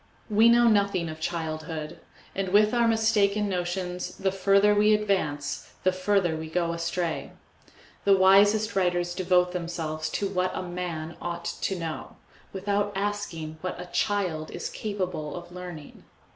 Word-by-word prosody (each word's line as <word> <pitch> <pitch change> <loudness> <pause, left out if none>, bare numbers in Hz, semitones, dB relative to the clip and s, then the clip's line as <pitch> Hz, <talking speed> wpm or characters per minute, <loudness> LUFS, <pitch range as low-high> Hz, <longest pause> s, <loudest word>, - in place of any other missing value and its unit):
We 220 +3 +6
know 235 0 +6
nothing 200 -6 +2
of 155 0 -7
childhood; 160 -1 -4 0.3
and 195 -1 -2
with 210 +3 +4
our 235 -1 +3
mistaken 215 -2 +2
notions 180 -1 -3
the 190 -1 0
further 195 +2 +4
we 210 +1 +5
advance 170 -9 -1
the 185 - +4
further 185 -2 +1
we 160 0 -6
go 170 0 0
astray. 170 0 -3 0.7
The 200 -1 +5
wisest 205 +3 +5
writers 175 -2 +1
devote 180 0 +2
themselves 165 -3 -3
to 200 - -1
what 185 -1 -1
a - - -3
man 175 -2 -5
ought 170 -1 -4
to 185 +2 -2
know, 165 -2 -5 0.4
without 200 +1 -1
asking 195 -6 -3
what 185 -1 -4
a 180 - -6
child 180 -7 0
is - - -5
capable 185 -8 -4
of 175 0 -9
learning. 175 -4 -9
180 Hz, 145 wpm, -27 LUFS, 170-200 Hz, 0.7 s, We